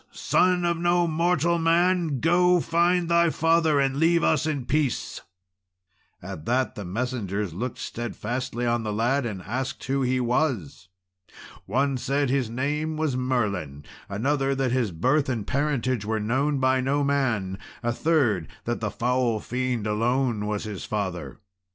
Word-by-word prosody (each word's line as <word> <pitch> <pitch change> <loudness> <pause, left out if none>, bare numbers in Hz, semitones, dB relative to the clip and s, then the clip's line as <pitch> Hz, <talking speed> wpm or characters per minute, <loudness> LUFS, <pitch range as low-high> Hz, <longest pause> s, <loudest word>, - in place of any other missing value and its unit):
Son 180 -1 +2
of 170 -1 +1
no 175 0 +2
mortal 170 +1 +1
man! 165 -2 +2
go, 180 +2 +4
find 175 +1 +2
thy 170 0 +4
father, 165 -2 +2
and 135 0 +1
leave 170 +2 +3
us 155 - +2
in 145 -5 -2
peace." 145 -1 -1 1.0
At 75 - -7
that 130 +2 +1
the 105 - -7
messengers 100 -2 -3
looked 115 +7 -4
steadfastly 120 +1 -4
on 120 0 +1
the 110 -1 -3
lad, 120 +5 +1
and 95 -5 -6
asked 130 +5 -4
who 135 +1 -1
he 130 0 +1
was. 120 - -1 0.8
One 135 +1 +1
said 140 +1 0
his 130 -4 0
name 150 +6 -2
was 155 -4 0
Merlin; 100 - -1 0.3
another, 135 +6 0
that 135 -2 0
his 120 -5 0
birth 130 - +1
and 115 -6 -2
parentage 130 -5 0
were 110 +1 -1
known 135 +7 0
by 130 0 +2
no 140 +3 +1
man; 120 -10 0 0.2
a 120 - +1
third, 120 - +1 0.2
that 120 0 -2
the 105 - -1
foul 120 0 0
fiend 125 -1 -2
alone 115 0 0
was 105 -1 -2
his 105 -4 -6
father. 90 - -4
130 Hz, 150 wpm, -25 LUFS, 110-150 Hz, 1.0 s, go